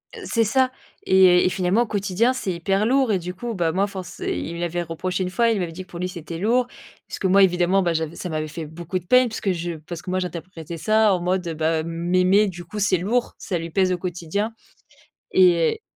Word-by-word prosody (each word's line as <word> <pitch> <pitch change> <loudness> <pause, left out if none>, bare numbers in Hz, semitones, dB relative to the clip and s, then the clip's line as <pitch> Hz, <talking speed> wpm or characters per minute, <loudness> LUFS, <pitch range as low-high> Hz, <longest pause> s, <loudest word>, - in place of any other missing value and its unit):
Heu, - - -9
c'est 230 - +1
ça 255 +4 +2 0.3
et 185 -2 +6
et - - +4
finalement, 185 +4 +1
au - - -4
quotidien, 205 +4 +1
c'est 195 -8 -3
hyper 195 +4 0
lourd 260 0 +3
et 195 - +2
du 180 +1 -6
coup, 235 +4 -5
bah 170 -3 +1
moi, 195 +3 +1
force 190 -3 -8
il 170 - -3
me - - -6
l'avait 175 0 -2
reproché 180 +3 -3
une 180 - -2
fois. 230 +5 +2
Il 220 -3 +1
m'avait 170 -2 -3
dit 185 +3 -7
que: - - -25
«Pour 170 - -7
lui, 180 - -1
c'était 170 -2 -7
lourd». 235 +6 +2 0.4
Parce - - -7
que 190 - +1
moi, 195 +1 +6
évidemment, 180 +1 +3
bah 170 -2 +1
j'avais 160 0 -2
ça 180 - -5
m'avait 155 -1 -2
fait 155 +1 -6
beaucoup 170 +4 -5
de 175 - -20
peine 250 +4 +5
parce 220 - -6
que 195 - +1
je 175 -1 -3 0.2
parce 170 -2 -6
que 185 - -9
moi, 185 - 0
j'interprétais 170 -2 -6
ça 215 +2 +3
en 185 - 0
mode, 180 0 -1
heu, 165 - -2
bah, 160 0 0
m'aimer 180 +5 +2
du 175 -2 -7
coup, 210 +5 -7
c'est 195 -2 +2
lourd, 230 +8 -1
ça 190 -5 -3
lui 165 0 -5
pèse 185 +2 +2
au 180 - 0
quotidien 180 +5 -3 0.8
et 180 - +4
185 Hz, 250 wpm, -23 LUFS, 170-200 Hz, 0.8 s, et